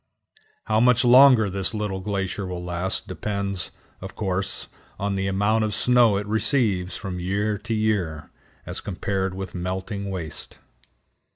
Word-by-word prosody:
How 110 0 +1
much 125 +1 +4
longer 125 -3 +7
this 95 +3 -2
little 105 -3 -2
glacier 95 0 -3
will 90 -1 -5
last 90 +2 -2
depends, 100 -3 -2 0.3
of 95 0 -8
course, 95 -1 -2 0.3
on 100 0 -1
the 95 0 -1
amount 105 +3 +2
of 105 -2 -1
snow 120 -4 +4
it 100 - -3
receives 105 -4 +1
from 95 -3 -5
year 100 +3 -1
to 110 +2 -4
year, 90 -9 -1 0.3
as - - -4
compared 95 -1 -2
with 95 -1 -6
melting 95 +3 -4
waste. 85 -5 -6
100 Hz, 145 wpm, -24 LUFS, 95-110 Hz, 0.3 s, longer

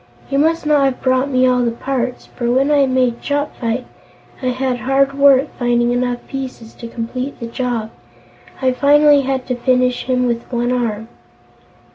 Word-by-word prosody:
You 275 - +1
must 325 +2 +1
not 300 -2 +3
have 265 -2 -1
brought 260 +1 +2
me 255 -1 +3
all 250 -1 +3
the 235 - +1
parts, 250 +1 -3
for 240 -1 -4
when 270 +4 +2
I 285 -2 +4
made 255 -2 0
Chopfyt 260 -4 -2 0.6
I 255 - -2
had 255 0 -1
hard 270 +3 +1
work 275 0 +4
finding 240 -1 +1
enough 245 0 -1
pieces 255 -4 -7
to 235 - -9
complete 250 +4 -5
the 235 - -5
job. 230 -2 -3 0.7
I 260 - +3
finally 290 +2 +5
had 265 -1 -2
to 250 - -2
finish 250 0 +1
him 250 -1 +1
with 235 0 -3
one 240 0 0
arm." 225 -3 -2
255 Hz, 170 wpm, -18 LUFS, 240-275 Hz, 0.7 s, finally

